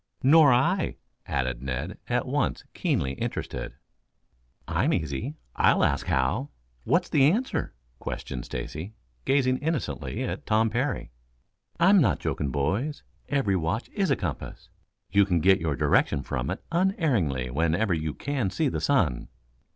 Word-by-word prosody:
"Nor 145 +1 +7
I," 165 +10 +2 0.3
added 60 -2 -1
Ned, 65 -1 -4
at - - 0
once - - -1
keenly 65 - 0
interested. - - -4 0.9
"I'm - - +1
easy. 70 -4 -2 0.2
I'll - - +4
ask - - +1
how? 85 - 0 0.4
What's - - +2
the 135 -2 +4
answer?" 235 +10 -1 0.2
questioned 60 -2 -5
Stacy, 80 - -6 0.3
gazing 130 -2 +2
innocently 155 -3 -2
at - - -4
Tom 110 +1 +3
Parry. 125 - -2 0.7
"I 175 +3 +6
am 200 -3 +6
not 90 - +3
joking, 70 0 -2
boys. 100 - -1 0.3
Every 135 -9 +1
watch 90 +7 -1
is 195 -3 -1
a - - +4
compass. 85 -7 -6 0.4
You 100 - +5
can 90 -3 +1
get 95 +2 +4
your 80 -3 0
direction 70 +1 +2
from 65 -2 -3
it - - -4
unerringly 135 - +1
whenever 85 - +1
you 80 -2 -2
can 135 -8 -1
see 145 +9 0
the - - -3
sun." 90 - +1
100 Hz, 145 wpm, -27 LUFS, -, 0.9 s, Nor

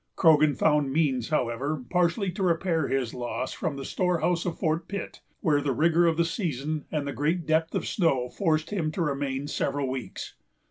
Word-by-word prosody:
Croghan 155 -3 +5
found 150 -3 +2
means, 135 -6 +1
however, 130 0 -1
partially 180 +2 +2
to 190 - -6
repair 170 -3 +1
his 130 -4 -1
loss 125 +1 -3
from 155 -3 -3
the 135 -1 -6
storehouse 180 -1 0
of 170 - -3
Fort 160 +2 -1
Pitt, 200 -1 -6 0.2
where 150 -5 +2
the 140 -2 0
rigor 170 +4 +4
of 165 -1 +2
the 170 - +3
season 155 - -2
and 150 -2 -1
the 140 - -3
great 160 +4 0
depth 160 +1 +1
of - - 0
the - - -5
snow 135 - +1
forced 155 +2 0
him 165 -7 -1
to 180 - -2
remain 140 -2 -2
several 140 -1 -1
weeks. 130 -3 -5
155 Hz, 190 wpm, -27 LUFS, 140-170 Hz, 0.2 s, Croghan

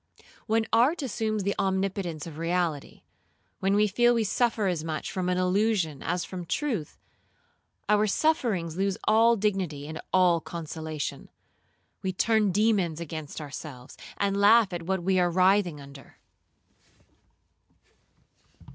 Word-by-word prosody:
When 220 0 +2
art 275 +8 +3
assumes 215 -4 -2
the 200 +1 0
omnipotence 190 -4 -1
of 160 -2 -9
reality, 165 -3 -2 0.6
when 195 +1 +1
we 210 +1 +4
feel 240 +4 +3
we 230 - +1
suffer 225 0 0
as 175 -5 -1
much 160 -1 -4
from 185 -2 -2
an 180 - 0
illusion 185 -5 +1
as 175 +2 -2
from 185 -2 -6
truth, 210 - -3 0.9
our 210 +1 +3
sufferings 205 - 0
lose 195 +1 -1
all 225 +2 +4
dignity 190 -9 -2
and 155 0 -6
all 180 -3 +4
consolation. 160 -2 -6 0.7
We 190 -1 -2
turn 215 +1 +2
demons 195 -5 +1
against 160 -2 -6
ourselves, 145 -3 -9 0.2
and 200 -1 0
laugh 205 0 +5
at 175 - -3
what 190 -2 -1
we 190 +1 +2
are 175 -1 +3
writhing 185 -2 +2
under. 140 0 -13
185 Hz, 130 wpm, -27 LUFS, 165-210 Hz, 0.9 s, laugh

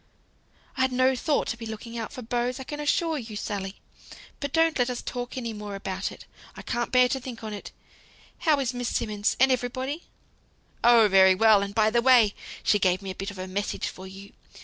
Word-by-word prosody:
"I'd 260 0 +2
no 255 +1 +3
thought 285 +4 0
to 235 - -3
be 230 -1 -7
looking 220 +2 -7
out 225 -2 -4
for 255 -3 -8
beaux, 240 +2 -1
I 265 - -6
can 295 +3 -7
assure 310 +1 0
you, 225 -3 -8
Sally. 200 -2 -4 0.6
But 285 -1 -4
don't 325 -2 +2
let 245 0 +2
us 250 - -3
talk 245 +1 -5
any 235 -3 -3
more 210 -1 -6
about 190 -1 -4
it; - - -12 0.3
I - - -9
can't 240 0 -2
bear 250 -1 +5
to 265 - -1
think 245 -3 -8
on 215 -1 -5
it. 205 - -8 0.7
How 305 -3 +3
is 260 -2 -1
Miss 245 -1 -3
Simmonds? 210 -2 -1
and 265 +1 +5
everybody?" 255 +5 -2 0.8
"Oh, 235 -2 +7
very 190 -1 +6
well; 215 0 +5
and 200 0 -4
by 220 -1 +3
the 235 +1 +3
way 240 -5 +5 0.3
she 205 - +3
gave 185 0 +1
me 190 - -4
a 185 - -8
bit 195 - -3
of 205 - -10
a 185 - -5
message 200 +2 -3
for 190 +1 -10
you. 195 +1 -12
235 Hz, 215 wpm, -26 LUFS, 205-255 Hz, 0.8 s, Oh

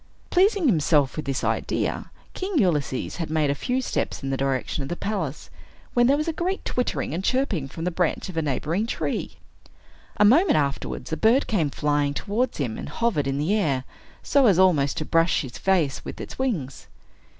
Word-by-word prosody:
Pleasing 390 0 +3
himself 155 - +3
with 155 - -4
this 135 -1 -2
idea, - - -1 0.2
King 380 -2 -3
Ulysses 150 - 0
had 165 -3 -3
made 155 -2 +1
a - - +2
few 250 - -2
steps - - -2
in 135 - -2
the - - +1
direction 135 +1 -1
of 135 - -5
the 175 - -2
palace, 175 -8 -4 0.4
when 240 0 +4
there 280 +2 +4
was 305 +2 -2
a 330 - 0
great 365 +4 -2
twittering 250 - -1
and 175 +4 -3
chirping 220 - 0
from 165 +4 -7
the 180 - 0
branch 175 -1 -1
of 185 - -8
a 165 - +1
neighboring 160 - -1
tree. - - -3 0.8
A 210 - +5
moment 315 - +5
afterwards, 140 +2 -2
a - - -1
bird 235 +5 +4
came 170 -10 0
flying 145 0 0
towards 225 - -1
him, 120 -7 -3
and - - -6
hovered 230 -12 0
in 135 0 -1
the 155 +8 +1
air, 145 -12 +1 0.4
so 275 -3 +4
as 195 -5 +4
almost 170 -7 +3
to 155 - -2
brush 165 +2 +2
his 130 -4 -8
face 175 -8 +1
with - - -8
its - - -8
wings. 175 - -2
165 Hz, 195 wpm, -24 LUFS, 145-235 Hz, 0.8 s, A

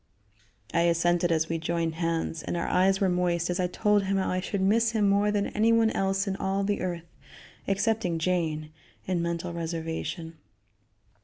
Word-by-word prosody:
I 170 - +3
assented 175 +1 +2
as 160 -1 +1
we 165 0 -2
joined 165 0 -1
hands, 165 -1 -2
and - - -3
our 170 - -2
eyes 190 +1 +3
were 195 - +2
moist 180 -1 0
as 180 - -2
I 180 - +1
told 205 +2 +1
him 195 +1 0
how 190 - 0
I 185 - 0
should 195 +2 -3
miss 225 +4 +3
him 210 -3 +2
more 200 +1 +3
than 205 -1 0
anyone 225 +1 +3
else 195 0 0
in 195 - -1
all 195 +1 -1
the 205 +1 -1
earth 175 -2 -3 0.6
excepting 195 -3 0
Jane, 160 -3 -1 0.3
in 180 -2 0
mental 170 +1 -3
reservation. 165 0 -4
180 Hz, 175 wpm, -27 LUFS, 170-195 Hz, 0.6 s, I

